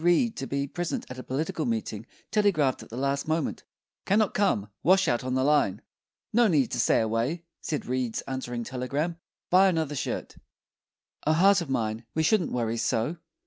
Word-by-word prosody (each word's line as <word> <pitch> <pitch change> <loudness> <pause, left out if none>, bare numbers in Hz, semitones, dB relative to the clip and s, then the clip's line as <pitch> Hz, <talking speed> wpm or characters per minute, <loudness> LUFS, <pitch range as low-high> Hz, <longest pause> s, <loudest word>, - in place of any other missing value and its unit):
Reed 175 +7 +3
to 135 - -4
be 140 0 -1
present 175 +4 -3
at 130 - -7
a - - -6
political 155 +3 -2
meeting 110 -1 -3 0.2
telegraphed 175 -11 +2
at - - -12
the 115 - -7
last 140 +2 -1
moment: 160 -2 -1 0.5
"Cannot 210 0 +3
come; 190 - +1
washout 185 -10 +3
on 130 0 -1
the 130 - +2
line." 145 -9 +3 0.5
"No 235 +1 +5
need 150 - +2
to 120 - -2
stay 115 - +4
away," 115 +10 -1 0.2
said 150 - -3
Reed's 125 -2 -1
answering 125 -3 -4
telegram; 140 +7 -2 0.3
"buy 190 +2 +7
another 160 -4 -1
shirt." 140 - -4 0.9
O 155 - +5
heart 195 +4 +5
of 165 - -6
mine, 110 -3 -1
we 160 - +2
shouldn't 185 +3 +2
Worry 115 -2 -1
so! 115 +7 0
140 Hz, 175 wpm, -27 LUFS, 125-170 Hz, 0.9 s, buy